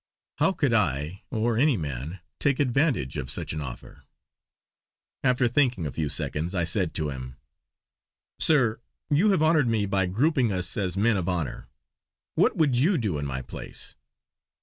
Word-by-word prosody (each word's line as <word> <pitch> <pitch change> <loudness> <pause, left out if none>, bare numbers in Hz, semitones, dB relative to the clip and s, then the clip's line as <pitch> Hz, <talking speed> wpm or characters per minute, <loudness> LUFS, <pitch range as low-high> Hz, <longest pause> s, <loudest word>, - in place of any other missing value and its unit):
How - - +4
could 145 -9 0
I, 85 - 0
or 115 0 0
any 145 -3 +4
man, 75 +3 -5 0.2
take 140 -2 +1
advantage 135 - +1
of 65 -3 -4
such - - 0
an 75 - -4
offer. 65 -4 -8 1.2
After 125 -1 +3
thinking 120 - +1
a 75 - -3
few 75 0 -2
seconds 80 +6 -3
I 85 - +1
said 85 +1 -1
to 75 -2 -1
him: 65 -1 -7 1.0
"Sir, 125 -9 +3 0.3
you 170 +9 +4
have 190 -6 +3
honoured 155 -4 +4
me 110 -3 +1
by 95 -2 +1
grouping 125 - +2
us 90 -2 -3
as 95 -2 -2
men 110 +1 +3
of 90 -1 -1
honour. 85 -9 -3 0.7
What - - +2
would 150 -6 +3
you 165 +10 +3
do 100 - -1
in 70 - -3
my 65 -1 -4
place?" - - -8
100 Hz, 165 wpm, -26 LUFS, 80-130 Hz, 1.2 s, How